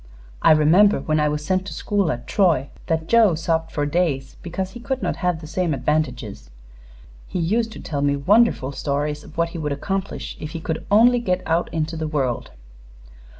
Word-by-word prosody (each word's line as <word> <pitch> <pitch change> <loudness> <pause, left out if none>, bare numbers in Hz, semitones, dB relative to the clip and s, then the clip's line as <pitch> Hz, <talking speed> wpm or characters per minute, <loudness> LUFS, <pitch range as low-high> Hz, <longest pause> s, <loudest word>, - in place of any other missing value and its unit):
I - - +5
remember, 170 +7 +5
when 155 0 0
I 150 0 +2
was 150 0 -3
sent 185 +2 0
to - - -6
school 200 -5 0
at 120 -2 -5
Troy, 165 -9 +2 0.2
that 160 -1 0
Joe 225 -6 +5
sobbed 165 0 -1
for 145 -2 -1
days 145 -3 -1
because 185 +2 -4
he 240 - -9
could 260 +2 -3
not - - -1
have 180 -3 -1
the - - -9
same 170 -1 -1
advantages. 125 - -2 0.8
He - - -4
used 220 +7 0
to - - -9
tell 145 -3 -4
me 140 0 +2
wonderful 185 - +3
stories 145 +2 -2
of - - -15
what 170 0 +1
he 170 - -7
would 150 -2 -2
accomplish 195 +7 -4
if 150 0 -7
he 165 - -4
could 160 0 -4
only 235 +4 +5
get 185 -5 -1
out 165 +2 0
into 160 0 -2
the 160 -1 -3
world. 135 -6 -2
160 Hz, 195 wpm, -22 LUFS, 150-185 Hz, 0.8 s, I